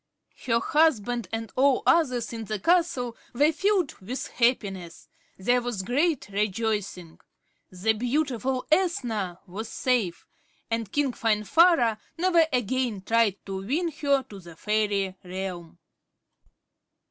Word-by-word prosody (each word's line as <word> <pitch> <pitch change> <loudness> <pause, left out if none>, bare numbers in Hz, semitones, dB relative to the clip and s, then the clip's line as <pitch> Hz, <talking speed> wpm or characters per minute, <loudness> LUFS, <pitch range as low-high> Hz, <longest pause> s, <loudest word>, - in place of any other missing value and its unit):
Her 230 -1 +3
husband 245 - +1
and 225 -1 -4
all 265 0 +3
others 255 -9 +2
in 225 -1 -5
the 215 0 -3
castle 270 - +1 0.2
were 290 +6 +4
filled 380 -2 +1
with 240 +8 -5
happiness. 195 -8 -1 0.3
There 245 +6 +2
was 235 -6 -3
great 275 - 0
rejoicing. 205 -4 -2 0.5
The 190 +5 0
beautiful 255 +1 -1
Ethna 235 - 0
was 205 +4 -7
safe, 235 -9 -1 0.5
and 225 -3 -2
King 285 -3 +1
Finvarra 230 - +3 0.2
never 340 -2 +4
again 245 -4 -1
tried 225 -2 +1
to 195 -1 -4
win 325 - -1
her 280 -2 +1
to 200 -5 -12
the 170 -3 -13
fairy 205 -1 0
realm. 180 -2 -6
230 Hz, 120 wpm, -26 LUFS, 200-275 Hz, 0.5 s, were